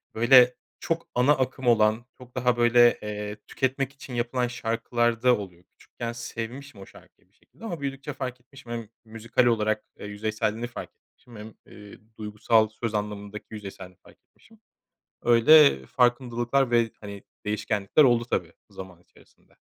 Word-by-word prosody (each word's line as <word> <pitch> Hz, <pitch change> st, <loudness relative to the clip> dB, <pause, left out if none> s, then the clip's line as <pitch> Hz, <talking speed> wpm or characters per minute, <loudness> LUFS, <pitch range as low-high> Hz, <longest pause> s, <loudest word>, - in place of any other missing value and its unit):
böyle 125 Hz, +2 st, +6 dB, 0.2 s
çok 165 Hz, 0 st, -3 dB
ana 125 Hz, +4 st, +4 dB
akım 130 Hz, -1 st, -2 dB
olan, 110 Hz, 0 st, +3 dB
çok 125 Hz, 0 st, -16 dB
daha 125 Hz, -1 st, +1 dB
böyle, 120 Hz, 0 st, +5 dB
eee, 105 Hz, 0 st, -5 dB
tüketmek 135 Hz, 0 st, -2 dB
için 135 Hz, -1 st, -11 dB
yapılan 120 Hz, +1 st, -1 dB
şarkılarda 120 Hz, 0 st, 0 dB
oluyor. 90 Hz, -4 st, -10 dB
Küçükken 115 Hz, +5 st, -8 dB
sevmişim 120 Hz, 0 st, -7 dB
o -, -, -10 dB
şarkıyı -, -, -20 dB
bir -, -, -40 dB
şekilde 230 Hz, -, -16 dB
ama 170 Hz, -8 st, -5 dB
büyüdükçe 140 Hz, +1 st, -5 dB
fark 130 Hz, -2 st, -6 dB
etmişim. 125 Hz, -1 st, -14 dB
Hem 115 Hz, -3 st, -5 dB, 0.2 s
müzikal 115 Hz, +2 st, -1 dB
olarak, 110 Hz, -2 st, +1 dB
eee, -, -, -8 dB
yüzeyselliğini 110 Hz, +2 st, -3 dB
fark 120 Hz, -, -8 dB
etmişim 120 Hz, -2 st, -21 dB
hem, 105 Hz, +1 st, -10 dB
ııı, 105 Hz, -1 st, -14 dB, 0.2 s
duygusal 110 Hz, +1 st, +1 dB
söz 110 Hz, 0 st, -5 dB
anlamındaki 105 Hz, 0 st, -5 dB
yüzeyselliğini 95 Hz, -4 st, -9 dB
fark -, -, -19 dB
etmişim. 225 Hz, -1 st, -24 dB, 0.6 s
Öyle 140 Hz, +6 st, +6 dB
farkındalıklar 120 Hz, +1 st, +1 dB
ve, 115 Hz, -1 st, +2 dB
hani, 100 Hz, -1 st, -9 dB, 0.2 s
değişkenlikler 105 Hz, +4 st, +1 dB
oldu 120 Hz, -3 st, +3 dB
tabii -, -, -2 dB, 0.2 s
zaman 95 Hz, -2 st, -11 dB
içerisinde. -, -, -26 dB
120 Hz, 145 wpm, -26 LUFS, 105-125 Hz, 0.6 s, böyle